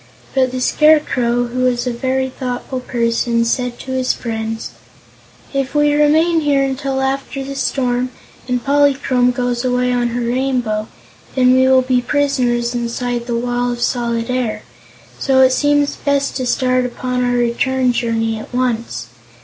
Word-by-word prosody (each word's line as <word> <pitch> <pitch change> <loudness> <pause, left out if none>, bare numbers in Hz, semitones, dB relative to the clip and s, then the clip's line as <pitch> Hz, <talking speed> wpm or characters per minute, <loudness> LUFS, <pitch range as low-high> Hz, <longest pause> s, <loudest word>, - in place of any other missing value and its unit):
But 260 -1 +2
the 255 - -3
Scarecrow, 250 -4 +3
who 245 +1 -5
was 250 -1 +1
a 250 - -1
very 260 +2 -1
thoughtful 255 0 -4
person, 235 -1 0
said 245 0 -1
to 260 - -7
his 260 -1 +1
friends: 225 -1 -4 0.8
"If 275 +1 -2
we 295 0 +3
remain 315 +3 +3
here 285 -3 +2
until 270 0 -2
after 270 0 -2
the 275 +1 -6
storm, 255 -2 -1 0.4
and 250 -1 -2
Polychrome 275 -3 +3
goes 245 0 -1
away 250 0 +1
on 245 -1 +1
her 240 +1 -3
Rainbow, 245 -4 -1 0.5
then 255 -1 +4
we 260 0 +4
will 260 0 +5
be 250 -1 +1
prisoners 245 -3 0
inside 240 0 -3
the 240 - -1
Wall 245 +1 -1
of 240 - -5
Solid 235 -1 -1
Air; 250 -4 -2 0.6
so 265 -1 +3
it 260 0 +6
seems 290 +1 +1
best 280 -1 0
to 255 -2 -2
start 255 0 +1
upon 250 0 -2
our 245 0 +1
return 250 +1 +1
journey 225 -2 -1
at - - -10
once. 235 - -1
250 Hz, 155 wpm, -17 LUFS, 240-265 Hz, 0.8 s, it